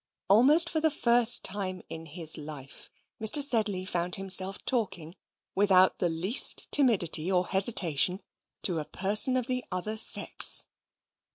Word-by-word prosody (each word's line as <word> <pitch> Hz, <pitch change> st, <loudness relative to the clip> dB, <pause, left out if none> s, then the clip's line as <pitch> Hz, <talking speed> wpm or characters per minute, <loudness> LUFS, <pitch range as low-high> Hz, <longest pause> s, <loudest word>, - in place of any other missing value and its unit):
Almost 280 Hz, -, +2 dB
for 320 Hz, -, -3 dB
the 320 Hz, -, +1 dB
first 235 Hz, -4 st, +3 dB
time 185 Hz, -2 st, -5 dB
in 165 Hz, 0 st, -11 dB
his 160 Hz, 0 st, -1 dB
life, 145 Hz, -3 st, -11 dB, 0.3 s
Mr. 220 Hz, +6 st, +5 dB
Sedley 220 Hz, -9 st, +2 dB
found 180 Hz, -1 st, 0 dB
himself 195 Hz, 0 st, +2 dB
talking, 180 Hz, -9 st, -4 dB, 0.4 s
without 190 Hz, -2 st, +1 dB
the 175 Hz, -, -2 dB
least 180 Hz, +10 st, +1 dB
timidity 190 Hz, -, +1 dB
or 180 Hz, -1 st, -1 dB
hesitation, 185 Hz, -3 st, -1 dB, 0.4 s
to 175 Hz, -5 st, -1 dB
a 150 Hz, -, -8 dB
person 210 Hz, -, +1 dB
of 250 Hz, -, -4 dB
the 255 Hz, 0 st, -4 dB
other 195 Hz, +4 st, -5 dB
sex. -, -, 0 dB
190 Hz, 140 wpm, -26 LUFS, 175-235 Hz, 0.4 s, Mr